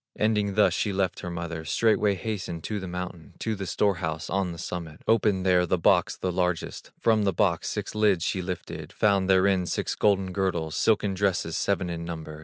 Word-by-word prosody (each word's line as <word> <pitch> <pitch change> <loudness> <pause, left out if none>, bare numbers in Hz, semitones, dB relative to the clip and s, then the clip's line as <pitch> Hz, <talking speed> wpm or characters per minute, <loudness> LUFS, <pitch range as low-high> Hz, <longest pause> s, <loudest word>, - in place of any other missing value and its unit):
Ending 105 -2 +1
thus 105 - +4
she 105 - 0
left 95 -2 -1
her 90 - -5
mother, 85 -1 -5
Straightway 105 +4 +2
hastened 90 -5 -4
to 105 -1 -3
the 95 - -6
mountain, 90 -3 -7
To 110 - -2
the 100 -2 -5
store 100 -1 +1
house 80 -1 -4
on 95 -2 0
the 85 - -8
summit, 80 -1 -6
Opened 105 -4 +2
there 90 -1 +4
the 90 - +2
box 85 - +3
the 95 - -2
largest, 90 -2 -2
From 110 -2 +3
the 100 - +2
box 90 -2 +1
six - - -4
lids 105 -5 +2
she 95 - -1
lifted, 90 -1 -6
Found 100 -2 +2
therein 95 -1 +3
six - - -1
golden 95 -3 +2
girdles, 90 -5 -1
Silken 105 -3 +2
dresses 95 -4 0
seven 95 -2 0
in 85 -1 -4
number. 80 -2 -7
95 Hz, 200 wpm, -26 LUFS, 85-100 Hz, -, thus